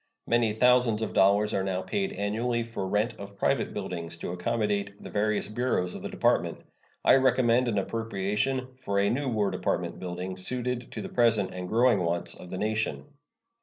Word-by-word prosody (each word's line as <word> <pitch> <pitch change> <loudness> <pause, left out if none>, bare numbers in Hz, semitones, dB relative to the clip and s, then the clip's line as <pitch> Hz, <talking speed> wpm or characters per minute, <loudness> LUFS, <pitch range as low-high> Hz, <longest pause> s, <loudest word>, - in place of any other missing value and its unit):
Many 115 -2 +2
thousands 125 -1 +4
of 110 - -3
dollars 100 +2 +4
are 95 - +1
now 95 -1 -2
paid 195 -2 -1
annually 115 +4 -1
for 115 -4 -4
rent 105 +4 +1
of 100 0 -9
private - - +1
buildings 85 -1 -5
to 85 - -5
accommodate 100 +1 -1
the - - -9
various 105 0 0
bureaus 105 -5 -1
of - - -7
the - - -5
Department. - - +1 0.5
I - - +7
recommend 125 -2 +3
an 110 -3 0
appropriation 115 +5 -1
for 100 -4 -1
a 100 0 +3
new 140 +3 -1
War 105 -4 +1
Department - - -2
building, 90 +1 -5
suited 125 +4 -2
to - - -5
the 190 - -6
present 115 - +2
and 90 0 -5
growing 120 -1 +4
wants 85 0 -1
of 90 - -11
the 95 - -5
nation. 110 +2 -1
105 Hz, 180 wpm, -28 LUFS, 95-120 Hz, 0.5 s, I